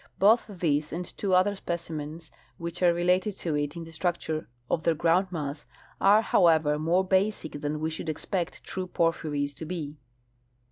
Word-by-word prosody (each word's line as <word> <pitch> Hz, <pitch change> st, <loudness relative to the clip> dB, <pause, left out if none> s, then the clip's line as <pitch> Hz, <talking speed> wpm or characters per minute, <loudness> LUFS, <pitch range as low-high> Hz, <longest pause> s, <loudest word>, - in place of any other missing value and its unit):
Both 220 Hz, +4 st, +5 dB
this 155 Hz, -6 st, 0 dB
and 175 Hz, +3 st, -3 dB
two 190 Hz, +1 st, -1 dB
other 195 Hz, +3 st, +3 dB
specimens 165 Hz, -3 st, -5 dB, 0.3 s
which 170 Hz, +1 st, -5 dB
are 175 Hz, -1 st, +6 dB
related 180 Hz, +4 st, +2 dB
to 170 Hz, -4 st, -3 dB
it 145 Hz, +1 st, -1 dB
in 170 Hz, -, -5 dB
the 165 Hz, -, -11 dB
structure 160 Hz, -3 st, -2 dB, 0.2 s
of 160 Hz, -, 0 dB
their 165 Hz, -, +2 dB
groundmass, 165 Hz, -3 st, 0 dB, 0.3 s
are, 205 Hz, +3 st, +6 dB
however, 160 Hz, -6 st, +4 dB
more 175 Hz, +4 st, +2 dB
basic 190 Hz, -6 st, 0 dB
than 150 Hz, +1 st, -2 dB
we 160 Hz, +1 st, -1 dB
should 160 Hz, 0 st, -5 dB
expect 175 Hz, +3 st, -3 dB
true 185 Hz, -1 st, -4 dB
porphyries 155 Hz, -5 st, 0 dB
to 150 Hz, +4 st, -7 dB
be. 155 Hz, -3 st, -5 dB
170 Hz, 160 wpm, -28 LUFS, 155-185 Hz, 0.3 s, are